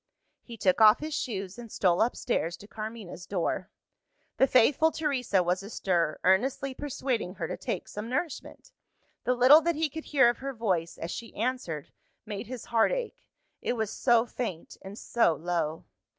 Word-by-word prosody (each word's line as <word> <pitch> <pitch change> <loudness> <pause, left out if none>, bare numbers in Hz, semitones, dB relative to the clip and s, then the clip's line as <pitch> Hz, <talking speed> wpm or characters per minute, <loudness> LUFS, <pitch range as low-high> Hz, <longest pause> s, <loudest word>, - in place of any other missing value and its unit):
He 235 -2 -11
took 190 +1 +2
off 215 +1 +8
his 310 +1 -5
shoes, 200 -8 -4
and 230 -2 -10
stole 180 -1 +2
upstairs 220 -7 0
to 205 - -13
Carmina's 215 -5 -7
door. 185 0 -2 0.7
The 265 - +5
faithful 275 +6 +4
Teresa 255 - 0
was 180 +2 0
astir, 180 -6 -1
earnestly 255 +8 +2
persuading 255 -8 -3
her - - -3
to - - -4
take - - -4
some 210 +2 -6
nourishment. 320 - -4 0.5
The 250 - +2
little 260 +6 +8
that 340 +1 0
he 310 -1 0
could 320 +2 -7
hear 270 -4 +4
of 240 - +1
her 275 +1 -4
voice, 185 -7 -1
as 165 - -5
she 230 - -7
answered, 220 - -3 0.3
made 210 0 -6
his 250 -1 -7
heart 230 -1 +3
ache - - -4 0.3
it - - -1
was 220 -3 -2
so 235 -2 +3
faint 225 -9 -5
and 195 +2 -9
so 230 -10 +2
low. 165 -2 -2
230 Hz, 170 wpm, -28 LUFS, 190-260 Hz, 0.7 s, off